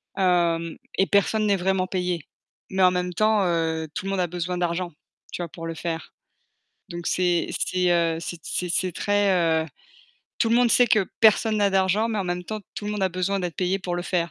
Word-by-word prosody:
hem, 170 Hz, -3 st, +1 dB, 0.2 s
et 195 Hz, -, +3 dB
personne 210 Hz, +2 st, +2 dB
n'est 200 Hz, -2 st, +3 dB
vraiment 185 Hz, 0 st, +1 dB
payé. 180 Hz, -4 st, -2 dB, 0.4 s
Mais 190 Hz, 0 st, +1 dB
en 180 Hz, -, +6 dB
même 180 Hz, 0 st, -2 dB
temps, 215 Hz, 0 st, +2 dB
heu, 160 Hz, -2 st, -1 dB
tout 190 Hz, -, -4 dB
le 195 Hz, -, -2 dB
monde 195 Hz, -2 st, 0 dB
a 175 Hz, -, +1 dB
besoin 180 Hz, +1 st, -3 dB
d'argent, 175 Hz, -1 st, -2 dB, 0.4 s
tu -, -, -4 dB
vois, 170 Hz, -, -4 dB
pour 165 Hz, 0 st, -8 dB
le 165 Hz, -, -3 dB
faire. 165 Hz, -2 st, -5 dB, 0.8 s
Donc 170 Hz, -1 st, -6 dB
c'est 180 Hz, -2 st, +1 dB
c'est 180 Hz, 0 st, 0 dB
heu, 165 Hz, -1 st, +2 dB
c'est 170 Hz, 0 st, -6 dB
c'est 180 Hz, 0 st, -1 dB
très 185 Hz, -5 st, +2 dB
heu, -, -, -7 dB, 0.7 s
tout 225 Hz, -, +2 dB
le 235 Hz, -, +4 dB
monde 245 Hz, -1 st, +4 dB
sait 245 Hz, -, +5 dB
que 210 Hz, -4 st, +3 dB
personne 220 Hz, 0 st, +5 dB
n'a 200 Hz, -1 st, +2 dB
d'argent, 195 Hz, +3 st, +2 dB
mais 215 Hz, -, -1 dB
en 195 Hz, -, -1 dB
même 175 Hz, 0 st, -3 dB
temps, 215 Hz, +2 st, -5 dB
tout 205 Hz, -, -6 dB
le 210 Hz, -, -2 dB
monde 205 Hz, -2 st, -3 dB
a 190 Hz, -, +3 dB
besoin 185 Hz, +2 st, -1 dB
d'être 175 Hz, -3 st, -4 dB
payé 185 Hz, +1 st, 0 dB
pour 180 Hz, -2 st, -4 dB
le 175 Hz, -, -2 dB
faire, 170 Hz, -2 st, -1 dB
180 Hz, 220 wpm, -24 LUFS, 170-195 Hz, 0.8 s, en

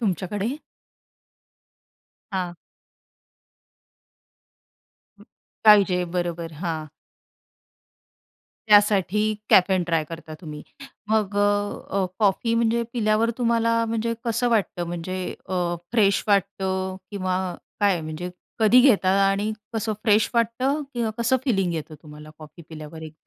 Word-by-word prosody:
तुमच्याकडे. 205 Hz, -, -2 dB, 1.8 s
हां. 180 Hz, -2 st, -2 dB, 2.6 s
अ -, -, -16 dB, 0.4 s
पाहिजे 195 Hz, -4 st, +6 dB
बरोबर, 170 Hz, -1 st, -3 dB
हां. 160 Hz, -3 st, -3 dB, 1.8 s
त्यासाठी 210 Hz, 0 st, +4 dB, 0.2 s
कॅफेन 185 Hz, -1 st, +5 dB
ट्राय 165 Hz, -2 st, +1 dB
करता 165 Hz, -1 st, -8 dB
तुम्ही. 150 Hz, -3 st, -8 dB, 0.5 s
मग 210 Hz, -2 st, 0 dB
अ, 205 Hz, -, +3 dB, 0.5 s
अ, 195 Hz, -1 st, +1 dB
कॉफी 220 Hz, +3 st, +2 dB
म्हणजे 235 Hz, 0 st, +2 dB
पिल्यावर 220 Hz, -1 st, +1 dB
तुम्हाला 230 Hz, -1 st, +2 dB
म्हणजे 230 Hz, +1 st, -1 dB
कसं 235 Hz, +1 st, 0 dB
वाटतं, 200 Hz, -6 st, 0 dB
म्हणजे 175 Hz, +2 st, -4 dB, 0.3 s
अ, -, -, -5 dB, 0.4 s
फ्रेश 205 Hz, -4 st, +3 dB
वाटतं 190 Hz, -1 st, 0 dB
किंवा 185 Hz, -2 st, -1 dB, 0.4 s
काय 200 Hz, -4 st, +3 dB
म्हणजे 155 Hz, +3 st, -6 dB, 0.3 s
कधी 225 Hz, +3 st, +6 dB
घेता 220 Hz, -8 st, +4 dB, 0.2 s
आणि 205 Hz, +2 st, -1 dB, 0.2 s
कसं 220 Hz, 0 st, -1 dB
फ्रेश 215 Hz, 0 st, +3 dB
वाटतं 255 Hz, +6 st, +1 dB
किंवा 235 Hz, -2 st, -1 dB
कसं 240 Hz, +3 st, +2 dB
फिलिंग 195 Hz, -9 st, +1 dB
येतं 160 Hz, 0 st, -6 dB
तुम्हाला 150 Hz, -1 st, -12 dB
कॉफी 155 Hz, +2 st, -13 dB
पिल्यावर 155 Hz, 0 st, -9 dB
एक. 155 Hz, -1 st, -9 dB
200 Hz, 110 wpm, -24 LUFS, 175-225 Hz, 2.6 s, पाहिजे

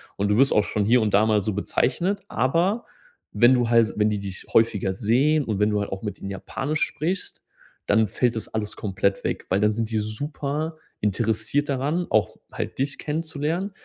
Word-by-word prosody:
und 100 Hz, +1 st, -1 dB
du 105 Hz, -, +3 dB
wirst 135 Hz, +1 st, +4 dB
auch 105 Hz, -, +4 dB
schon 105 Hz, 0 st, -1 dB
hier 120 Hz, +2 st, +4 dB
und 105 Hz, -2 st, 0 dB
da 105 Hz, +2 st, +5 dB
mal 105 Hz, -2 st, +2 dB
so 110 Hz, -, -1 dB
bezeichnet. 175 Hz, -, 0 dB
Aber 170 Hz, -, +1 dB, 0.5 s
wenn 120 Hz, +2 st, +6 dB
du 120 Hz, -2 st, +2 dB
halt 115 Hz, -2 st, +4 dB
wenn 105 Hz, 0 st, +3 dB
die 105 Hz, -1 st, -1 dB
dich 95 Hz, -1 st, -6 dB
häufiger 105 Hz, -4 st, +3 dB
sehen 135 Hz, +10 st, +2 dB
und 110 Hz, -6 st, -2 dB
wenn 105 Hz, 0 st, +3 dB
du 105 Hz, -1 st, 0 dB
halt 100 Hz, -, -4 dB
auch 95 Hz, +2 st, -5 dB
mit 105 Hz, -3 st, -5 dB
ihnen 100 Hz, -, -6 dB
Japanisch 140 Hz, +10 st, -3 dB
sprichst, 175 Hz, +6 st, -2 dB, 0.4 s
dann 110 Hz, +1 st, +3 dB
fällt 120 Hz, +2 st, 0 dB
das 110 Hz, -, -5 dB
alles 105 Hz, -2 st, -4 dB
komplett 100 Hz, -1 st, -1 dB
weg, -, -, -2 dB
weil 95 Hz, -, +2 dB
dann 105 Hz, +1 st, +3 dB
sind 115 Hz, 0 st, -3 dB
die 110 Hz, -, +1 dB
super 145 Hz, +8 st, -3 dB, 0.2 s
interessiert 110 Hz, +6 st, 0 dB
daran, 145 Hz, +6 st, -1 dB
auch 110 Hz, -, +1 dB
halt -, -, -5 dB
dich 140 Hz, +1 st, -1 dB
kennenzulernen. 160 Hz, +4 st, -2 dB
115 Hz, 200 wpm, -24 LUFS, 105-145 Hz, 0.5 s, wenn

